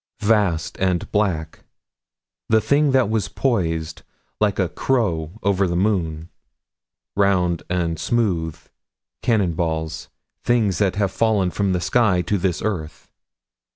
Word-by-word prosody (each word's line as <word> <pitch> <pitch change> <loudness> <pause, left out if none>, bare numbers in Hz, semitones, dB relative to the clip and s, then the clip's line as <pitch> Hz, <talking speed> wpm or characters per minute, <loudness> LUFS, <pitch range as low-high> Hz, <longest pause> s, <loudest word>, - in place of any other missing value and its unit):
27 110 +2 +3
Vast 85 -4 -3
and 90 -2 0
black. 90 -7 -1 0.9
The 110 - +5
thing 140 +7 +2
that 130 -3 +3
was 110 -2 0
poised, 80 -10 -1 0.4
like 105 -2 +1
a 95 - +1
crow 85 -6 -1
over 100 -1 +2
the 85 - -2
moon. 85 -5 0 0.9
Round 90 -4 +2
and 85 -3 -1
smooth. 85 -7 0 0.6
Cannon 105 -8 +1
balls. 80 -1 -3 0.3
Things 110 -7 +1
that 95 -3 +1
have 100 -2 0
fallen 105 -5 +1
from 100 0 0
the 90 - 0
sky 105 -5 +2
to 100 +3 0
this 90 -1 -1
earth. 80 -8 -4
95 Hz, 130 wpm, -21 LUFS, 85-105 Hz, 0.9 s, The